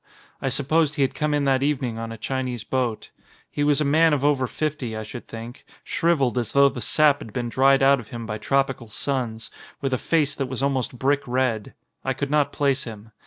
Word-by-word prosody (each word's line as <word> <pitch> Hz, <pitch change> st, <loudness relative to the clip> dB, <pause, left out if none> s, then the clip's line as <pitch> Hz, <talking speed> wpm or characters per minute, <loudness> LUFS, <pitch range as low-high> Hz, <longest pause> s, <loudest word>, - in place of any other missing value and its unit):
I 135 Hz, -, 0 dB
supposed 150 Hz, +3 st, +1 dB
he 140 Hz, -, +2 dB
had 135 Hz, -, 0 dB
come 150 Hz, 0 st, -1 dB
in 145 Hz, -1 st, +1 dB
that 135 Hz, -1 st, +2 dB
evening 130 Hz, -5 st, -1 dB
on 115 Hz, 0 st, -5 dB
a 115 Hz, -, -7 dB
Chinese 130 Hz, -1 st, -3 dB
boat. 125 Hz, -4 st, -2 dB, 0.4 s
He 145 Hz, -, -1 dB
was 145 Hz, -1 st, +3 dB
a 150 Hz, -, +1 dB
man 160 Hz, +3 st, +4 dB
of 140 Hz, -1 st, 0 dB
over 140 Hz, -3 st, +2 dB
fifty, 140 Hz, -6 st, -3 dB
I 110 Hz, -, -4 dB
should 115 Hz, +3 st, -9 dB
think, 115 Hz, +2 st, -9 dB, 0.2 s
shrivelled 140 Hz, -7 st, +1 dB
as 120 Hz, -, -4 dB
though 140 Hz, 0 st, +6 dB
the 125 Hz, -, -7 dB
sap 150 Hz, +1 st, +3 dB
had 115 Hz, -, -9 dB
been 120 Hz, -1 st, -2 dB
dried 135 Hz, +2 st, +4 dB
out 140 Hz, 0 st, +5 dB
of 115 Hz, -, -10 dB
him 115 Hz, 0 st, -7 dB
by 105 Hz, -1 st, -4 dB
tropical 135 Hz, 0 st, 0 dB
suns, 115 Hz, -2 st, -2 dB, 0.3 s
with 135 Hz, -2 st, -2 dB
a 130 Hz, -, 0 dB
face 150 Hz, -4 st, +1 dB
that 135 Hz, -2 st, -3 dB
was 130 Hz, 0 st, -3 dB
almost 130 Hz, -3 st, -1 dB
brick 140 Hz, +3 st, +2 dB
red. 125 Hz, -4 st, -1 dB, 0.3 s
I -, -, 0 dB
could 140 Hz, 0 st, -4 dB
not 145 Hz, -1 st, +2 dB
place 140 Hz, -1 st, 0 dB
him. 110 Hz, -1 st, -9 dB
135 Hz, 220 wpm, -24 LUFS, 120-145 Hz, 0.4 s, though